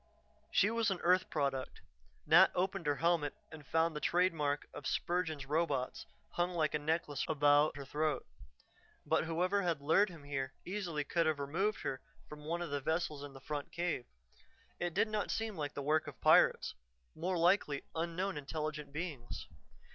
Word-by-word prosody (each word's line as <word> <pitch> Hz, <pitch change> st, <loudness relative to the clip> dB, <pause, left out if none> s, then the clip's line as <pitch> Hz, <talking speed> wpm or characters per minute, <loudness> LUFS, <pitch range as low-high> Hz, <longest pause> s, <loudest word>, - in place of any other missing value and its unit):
She 205 Hz, -, +3 dB
was 230 Hz, -1 st, +1 dB
an 190 Hz, -2 st, -1 dB
earth 180 Hz, +1 st, +3 dB
product; 140 Hz, -3 st, -2 dB, 0.5 s
Nat 180 Hz, +4 st, +7 dB
opened 185 Hz, -2 st, -1 dB
her 145 Hz, -, +3 dB
helmet 165 Hz, -2 st, +1 dB, 0.2 s
and 155 Hz, -2 st, -10 dB
found 165 Hz, 0 st, +2 dB
the -, -, -2 dB
trade 180 Hz, +3 st, +2 dB
mark 145 Hz, -2 st, -1 dB
of 140 Hz, -, -6 dB
Spurgin's 165 Hz, -5 st, -1 dB
Robots 145 Hz, -3 st, -1 dB, 0.2 s
hung 175 Hz, +1 st, -1 dB
like 155 Hz, -2 st, +1 dB
a 150 Hz, -, +1 dB
necklace 150 Hz, -2 st, -1 dB
about 145 Hz, -1 st, +4 dB
her 140 Hz, -, -6 dB
throat. 150 Hz, -1 st, -1 dB, 0.8 s
But -, -, +2 dB
whoever 180 Hz, +5 st, +1 dB
had 170 Hz, -5 st, 0 dB
lured 165 Hz, +8 st, +3 dB
him 165 Hz, -5 st, -11 dB
here 135 Hz, -2 st, -3 dB
easily 175 Hz, -6 st, -2 dB
could 165 Hz, +3 st, +1 dB
have 155 Hz, -2 st, +1 dB
removed 170 Hz, +10 st, -1 dB
her 130 Hz, -, -3 dB, 0.3 s
from 150 Hz, 0 st, -10 dB
one 170 Hz, +2 st, -1 dB
of 170 Hz, -, -6 dB
the 145 Hz, -1 st, -1 dB
vessels 160 Hz, -1 st, -1 dB
in 145 Hz, -1 st, -8 dB
the 135 Hz, -, -10 dB
front 145 Hz, 0 st, -5 dB
cave. 170 Hz, -7 st, -2 dB, 0.7 s
It 175 Hz, -2 st, -2 dB
did -, -, +3 dB
not 215 Hz, -1 st, -2 dB
seem 225 Hz, -2 st, -2 dB
like 145 Hz, -3 st, -4 dB
the 140 Hz, -, -3 dB
work 155 Hz, +2 st, +2 dB
of -, -, -9 dB
pirates, -, -, +5 dB, 0.4 s
more 180 Hz, +3 st, -2 dB
likely 170 Hz, -5 st, +2 dB
unknown 170 Hz, +2 st, -2 dB
intelligent 150 Hz, 0 st, -4 dB
beings. 150 Hz, -6 st, -5 dB
160 Hz, 175 wpm, -34 LUFS, 145-175 Hz, 0.8 s, Nat